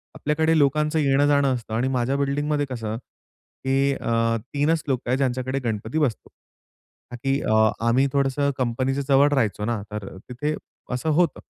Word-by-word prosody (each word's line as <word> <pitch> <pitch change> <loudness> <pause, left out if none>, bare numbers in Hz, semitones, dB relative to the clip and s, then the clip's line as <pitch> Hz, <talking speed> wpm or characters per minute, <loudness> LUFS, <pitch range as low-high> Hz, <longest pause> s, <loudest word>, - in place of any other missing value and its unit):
आपल्याकडे 160 +2 +1
लोकांचं 150 +2 +2
येणं-जाणं 140 -1 +3
असतं 115 -2 -7
आणि 120 +3 +1
माझ्या 125 +3 0
बिल्डिंगमध्ये 145 +1 0
कसं 115 -3 -4
की 135 +2 -3
अ, 115 -2 0 0.2
3च 150 +2 +1
लोक 130 -3 0
आहेत 125 +2 +2
ज्यांच्याकडे 130 0 -1
गणपती 110 +5 -2
बसतो. 135 -8 -1 0.8
ताकी 135 +3 -1 0.5
आम्ही 125 +4 +4
थोडंसं 140 0 +1
कंपनीच्या 130 +2 -1
जवळ 140 0 +5
राहायचो 110 -6 0
ना 115 -2 -1
तर 105 -2 -5 0.2
तिथे 150 +5 -2 0.4
असं 125 +6 -1
होतं. 170 +3 +2
135 Hz, 140 wpm, -24 LUFS, 120-145 Hz, 0.8 s, जवळ